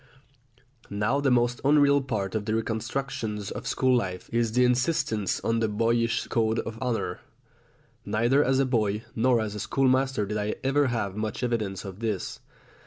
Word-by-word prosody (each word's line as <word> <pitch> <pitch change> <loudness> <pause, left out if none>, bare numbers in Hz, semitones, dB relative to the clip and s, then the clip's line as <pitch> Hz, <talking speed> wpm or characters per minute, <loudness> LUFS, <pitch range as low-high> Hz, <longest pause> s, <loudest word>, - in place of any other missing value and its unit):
Now 105 +7 0
the 140 - +2
most 120 -1 +2
unreal 140 0 +5
part 105 -8 -3
of 110 -2 -2
the 110 0 0
reconstructions 115 -2 -3
of - - -6
school 130 -1 +2
life 95 -6 -3
is 115 -1 +1
the 125 +1 +4
insistence 125 - +1
on 115 0 0
the 115 - +1
boyish 115 +2 +1
code 110 -1 0
of 115 0 -4
honour. 125 -3 -2 0.8
Neither 120 +6 +2
as 130 +1 +2
a 135 - +3
boy 110 -4 0
nor 120 +1 +3
as 110 -2 -3
a 105 - -5
schoolmaster 130 0 +1
did 105 +1 -3
I 105 +1 -2
ever 140 +1 +2
have 105 -6 -2
much 110 +3 -3
evidence 110 -6 -2
of 95 0 -8
this. 110 -5 -3
115 Hz, 170 wpm, -27 LUFS, 105-130 Hz, 0.8 s, unreal